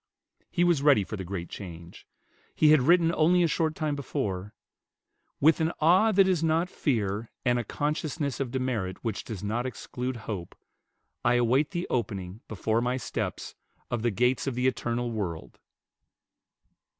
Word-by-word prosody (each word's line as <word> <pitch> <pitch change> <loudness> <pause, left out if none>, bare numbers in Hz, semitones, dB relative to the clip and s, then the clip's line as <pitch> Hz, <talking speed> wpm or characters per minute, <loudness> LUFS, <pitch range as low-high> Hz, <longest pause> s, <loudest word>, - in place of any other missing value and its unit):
He 175 - +1
was 175 -5 +3
ready 140 -8 +5
for 110 - -6
the 95 - -5
great 90 -1 -5
change. 85 -3 -10 0.5
He 155 -1 +5
had 155 -3 +6
written 170 +4 +4
only 175 +3 +4
a - - +4
short 160 0 0
time 150 -2 -1
before, 100 -8 -3 0.9
"With 160 +3 +4
an 160 +1 +2
awe 185 +8 +5
that 195 -1 +5
is 180 -4 +1
not 165 +3 +1
fear, 110 - -1 0.2
and 125 -1 +3
a - - -2
consciousness 145 - -2
of 135 -3 -1
demerit 120 -8 -2
which 115 -4 -3
does 105 -4 -7
not 115 +5 -1
exclude 125 0 -5
hope, 95 -6 -5 0.7
I 120 0 +3
await 125 +5 +3
the 175 -1 -3
opening, 100 -4 -3
before 110 +2 0
my 125 +1 0
steps, 130 - -4 0.4
of 120 - -1
the 120 - +2
gates 125 +6 +1
of 135 - -1
the 125 +1 0
eternal 120 -2 0
world." 95 -8 -5
125 Hz, 160 wpm, -28 LUFS, 105-155 Hz, 0.9 s, had